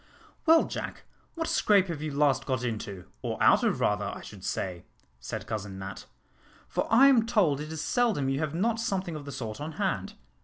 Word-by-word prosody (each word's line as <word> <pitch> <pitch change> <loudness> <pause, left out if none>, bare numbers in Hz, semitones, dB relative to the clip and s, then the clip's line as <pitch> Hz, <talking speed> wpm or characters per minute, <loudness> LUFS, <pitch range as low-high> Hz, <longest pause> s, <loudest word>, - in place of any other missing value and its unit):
"Well, 325 0 +7
Jack, - - -6 0.3
what 325 -1 -2
scrape 200 -3 +4
have 165 -5 -5
you 155 -1 -3
last 140 -2 +2
got 130 -3 -1
into, 105 -6 -4 0.2
or - - -3
out - - +5
of - - +1
rather, - - +1
I - - -5
should - - -11
say?" 90 -3 -3 0.4
said 60 - -5
Cousin 100 -3 -5
Nat, 95 0 -7 0.6
"for - - -2
I 245 +4 +7
am 245 -5 +5
told 180 - +2
it 155 +1 -6
is 160 -2 -4
seldom 225 - +1
you 135 +1 0
have 155 0 -2
not 225 +5 +1
something 190 -6 -2
of 150 -2 -7
the 140 - -6
sort 115 -2 -5
on 155 +2 -5
hand. 200 +3 -2
150 Hz, 200 wpm, -28 LUFS, 130-210 Hz, 0.6 s, Well